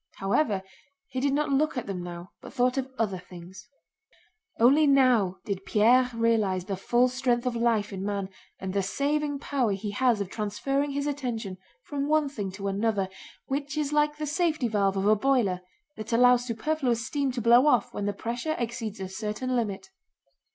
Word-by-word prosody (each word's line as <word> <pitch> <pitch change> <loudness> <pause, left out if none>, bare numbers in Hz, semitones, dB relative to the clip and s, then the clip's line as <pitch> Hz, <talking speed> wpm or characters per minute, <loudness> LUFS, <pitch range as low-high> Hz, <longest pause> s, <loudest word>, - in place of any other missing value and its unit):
However, 195 0 0 0.5
he 260 - -3
did 280 +2 +1
not 295 0 0
look 280 0 +1
at 250 - -2
them 190 -3 -4
now, 175 0 -8
but - - -11
thought 250 -1 +2
of 265 -1 -3
other 195 -5 -1
things. 180 +2 -12 0.9
Only 280 +6 +5
now 250 -9 +4
did 195 -3 -3
Pierre 245 +5 +4
realize 215 -6 +1
the 195 - -3
full 240 +6 +2
strength 250 -1 0
of 250 -1 -1
life 230 -3 +1
in 190 0 -5
man 200 -1 -2 0.3
and 190 0 -5
the 200 - +1
saving 290 +8 -1
power 270 -6 0
he 200 +1 -4
has 245 0 +2
of 200 - -2
transferring 220 +8 -2
his 280 0 -2
attention 240 -10 -3 0.2
from 285 -1 -3
one 305 -1 +2
thing 205 -8 -4
to 200 +1 -5
another, 200 -1 0 0.4
which 285 +2 -3
is 300 -1 -1
like 295 0 +2
the 305 - -3
safety 315 -3 0
valve 200 -3 +1
of 195 - 0
a 215 +1 +5
boiler 215 -6 +1 0.4
that 215 +1 -6
allows 245 +1 +5
superfluous 245 -1 -1
steam 280 +2 -1
to 245 - -3
blow 240 +4 +5
off 245 -8 +2
when 205 - -3
the - - +1
pressure 240 +9 -3
exceeds 230 -3 -4
a 190 - -4
certain 215 +6 -3
limit. 195 -5 -3
235 Hz, 185 wpm, -27 LUFS, 200-275 Hz, 0.9 s, Only